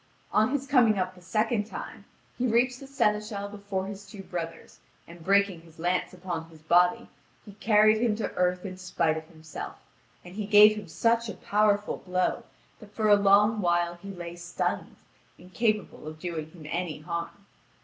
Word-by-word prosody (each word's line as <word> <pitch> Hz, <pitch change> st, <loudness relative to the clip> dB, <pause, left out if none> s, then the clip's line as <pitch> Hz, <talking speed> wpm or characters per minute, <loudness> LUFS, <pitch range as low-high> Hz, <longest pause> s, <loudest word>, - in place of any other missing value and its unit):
On 215 Hz, +2 st, +3 dB
his 275 Hz, 0 st, -1 dB
coming 245 Hz, -6 st, +4 dB
up 185 Hz, 0 st, -1 dB
the 180 Hz, -, -17 dB
second 215 Hz, +3 st, 0 dB
time, -, -, -8 dB, 0.3 s
he 255 Hz, -, 0 dB
reached 245 Hz, +2 st, +2 dB
the 275 Hz, -, -10 dB
seneschal 210 Hz, -6 st, 0 dB
before 200 Hz, -2 st, -4 dB
his 200 Hz, 0 st, -7 dB
two 195 Hz, 0 st, -10 dB
brothers, 165 Hz, -3 st, -7 dB, 0.3 s
and 170 Hz, 0 st, -13 dB
breaking 200 Hz, -2 st, +2 dB
his 165 Hz, -1 st, -19 dB
lance 175 Hz, +2 st, 0 dB
upon 175 Hz, -3 st, -5 dB
his 160 Hz, -1 st, -16 dB
body, 180 Hz, +8 st, +3 dB, 0.4 s
he 205 Hz, -, -10 dB
carried 215 Hz, +1 st, +4 dB
him 230 Hz, -3 st, +2 dB
to 220 Hz, -, -3 dB
earth 180 Hz, +1 st, 0 dB
in 185 Hz, -1 st, -6 dB
spite 175 Hz, -3 st, 0 dB
of 160 Hz, 0 st, -6 dB
himself, 160 Hz, -2 st, -8 dB, 0.5 s
and 180 Hz, -, -11 dB
he 205 Hz, 0 st, -4 dB
gave 210 Hz, 0 st, +8 dB
him 210 Hz, -3 st, -7 dB
such 230 Hz, +7 st, +1 dB
a -, -, -6 dB
powerful 205 Hz, 0 st, +1 dB
blow 185 Hz, 0 st, -1 dB, 0.4 s
that 210 Hz, -2 st, -15 dB
for 215 Hz, -1 st, +1 dB
a 205 Hz, -, +8 dB
long 205 Hz, +2 st, +4 dB
while 175 Hz, -1 st, +1 dB
he 175 Hz, +3 st, -11 dB
lay 175 Hz, -3 st, -7 dB
stunned, 175 Hz, 0 st, -3 dB, 0.4 s
incapable 210 Hz, -1 st, -2 dB
of 155 Hz, 0 st, -7 dB
doing 160 Hz, -3 st, -5 dB
him 160 Hz, -2 st, -14 dB
any 165 Hz, -2 st, -3 dB
harm. 170 Hz, +4 st, -5 dB
195 Hz, 180 wpm, -27 LUFS, 175-215 Hz, 0.5 s, gave